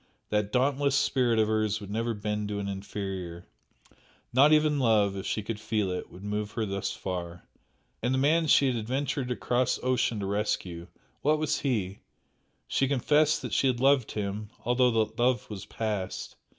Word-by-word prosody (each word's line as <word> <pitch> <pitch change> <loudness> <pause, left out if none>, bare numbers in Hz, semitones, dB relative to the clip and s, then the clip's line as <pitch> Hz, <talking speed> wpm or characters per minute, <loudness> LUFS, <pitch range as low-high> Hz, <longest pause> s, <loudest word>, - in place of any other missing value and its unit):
That 105 -1 0
dauntless 135 +2 +2
spirit 125 -4 +2
of 110 -1 +3
hers 110 -1 +1
would 100 -2 -9
never 115 +2 -1
bend 105 0 -2
to 105 0 -3
an 100 -1 -3
inferior, 95 -3 -5 0.9
not 140 +4 +6
even 150 -1 +4
love 105 -5 +3
(if 95 0 -5
she 105 - -1
could 105 0 -4
feel 105 -3 -1
it) 90 - -4
would 90 - -12
move 105 0 -3
her 115 -2 -1
thus 100 -1 -2
far. 90 -2 -5 0.5
And 120 - 0
the 130 - +2
man 155 +4 +3
she 140 - +5
had 130 -2 +1
adventured 130 +3 -2
across 125 0 0
ocean 125 -3 +1
to 100 - -3
rescue 95 -4 -2 0.3
what 150 +2 +3
was 155 0 0
he? 105 -8 -1 0.7
She 135 - +1
confessed 150 +3 +2
that - - -5
she 135 - +3
had 125 -2 +1
loved 135 -2 +3
him, 105 0 -3 0.2
though 125 +1 +4
that 115 -1 0
love 125 +1 +2
was 100 -3 -7
past. 105 -4 -4
110 Hz, 175 wpm, -28 LUFS, 100-130 Hz, 0.9 s, not